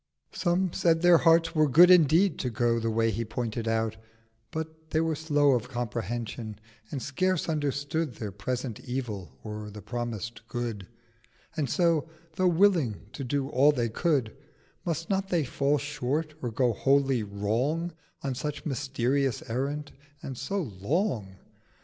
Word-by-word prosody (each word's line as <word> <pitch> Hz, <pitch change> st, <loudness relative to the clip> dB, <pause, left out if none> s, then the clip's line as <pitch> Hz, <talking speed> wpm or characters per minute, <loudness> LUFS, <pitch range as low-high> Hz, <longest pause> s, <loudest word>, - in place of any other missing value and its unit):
Some 175 Hz, 0 st, 0 dB
said 165 Hz, -1 st, +2 dB
their 175 Hz, -2 st, +7 dB
Hearts 165 Hz, 0 st, +4 dB
were 155 Hz, -3 st, +3 dB
good 175 Hz, +7 st, +8 dB
indeed 170 Hz, +2 st, +5 dB
to 125 Hz, -, -1 dB
go 115 Hz, 0 st, +1 dB
The 115 Hz, 0 st, -1 dB
Way 115 Hz, 0 st, +2 dB
he 115 Hz, +3 st, -2 dB
pointed 115 Hz, 0 st, -3 dB
out: 110 Hz, -1 st, 0 dB, 0.5 s
but 160 Hz, 0 st, -6 dB
they 160 Hz, -, +1 dB
were 165 Hz, 0 st, +1 dB
slow 145 Hz, -2 st, +3 dB
Of 125 Hz, -1 st, 0 dB
Comprehension, 115 Hz, -2 st, -4 dB, 0.3 s
and 140 Hz, -, -3 dB
scarce 185 Hz, +5 st, 0 dB
understood 145 Hz, -2 st, -1 dB
Their 105 Hz, -2 st, -5 dB
present 120 Hz, +4 st, -4 dB
Evil 105 Hz, -, -5 dB
or 105 Hz, 0 st, -6 dB
the 105 Hz, 0 st, -10 dB
promised 115 Hz, -1 st, -4 dB
Good: 115 Hz, -6 st, -4 dB, 0.7 s
And 150 Hz, -4 st, -1 dB
so, 165 Hz, -4 st, +2 dB, 0.3 s
tho' 185 Hz, -, +3 dB
willing 165 Hz, -, +2 dB
to 140 Hz, -, -5 dB
do 135 Hz, +1 st, -1 dB
all 140 Hz, +3 st, +5 dB
they 120 Hz, -5 st, -1 dB
could, 135 Hz, -1 st, +1 dB
640 -, -, -22 dB, 0.5 s
Must 165 Hz, 0 st, -2 dB
not 195 Hz, 0 st, 0 dB
they 175 Hz, -4 st, +2 dB
fall 140 Hz, +2 st, +1 dB
short, 145 Hz, +2 st, -2 dB
or 120 Hz, -, -2 dB
go 120 Hz, +1 st, +1 dB
wholly 135 Hz, +1 st, +2 dB
wrong, 115 Hz, +12 st, -1 dB, 0.3 s
On 135 Hz, -, -1 dB
such 150 Hz, +3 st, -4 dB
mysterious 135 Hz, -2 st, 0 dB
Errand, 145 Hz, +4 st, -2 dB, 0.3 s
and 135 Hz, -, -5 dB
so 185 Hz, +10 st, -2 dB, 0.2 s
long? 110 Hz, -, -1 dB
135 Hz, 155 wpm, -28 LUFS, 115-160 Hz, 0.7 s, good